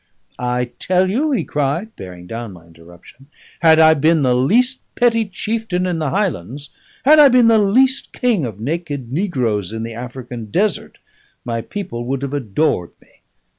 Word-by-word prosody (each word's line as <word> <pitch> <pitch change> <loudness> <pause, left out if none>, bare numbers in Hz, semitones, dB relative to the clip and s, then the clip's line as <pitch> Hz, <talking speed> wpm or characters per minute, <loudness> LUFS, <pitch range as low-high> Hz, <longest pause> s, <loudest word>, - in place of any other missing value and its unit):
"I 125 0 -2
tell 185 0 +1
you," 285 +9 0
he 270 - 0
cried, 150 +10 -2
bearing 90 -2 -10
down 115 +1 -7
my 85 -2 -15
interruption, 85 +10 -18 0.3
"had 160 -1 +5
I 160 0 +7
been 155 +1 +2
the 125 -1 +3
least 240 - +2
petty 230 -2 +2
chieftain 200 -1 -3
in 175 -3 -2
the 155 -3 -1
Highlands, 140 - -3 0.4
had 305 +2 +7
I 295 - +9
been 245 -2 +5
the 225 -1 +5
least 255 +7 +2
king 235 - 0
of 110 -5 -5
naked 145 -1 -4
negroes 125 - -1
in 110 0 -5
the 115 0 -6
African 120 0 -7
desert, 200 - -1 0.5
my 115 -1 -2
people 180 - -6
would 135 +2 -3
have 140 0 -4
adored 125 - -1
me. - - -28
145 Hz, 170 wpm, -18 LUFS, -, 0.5 s, I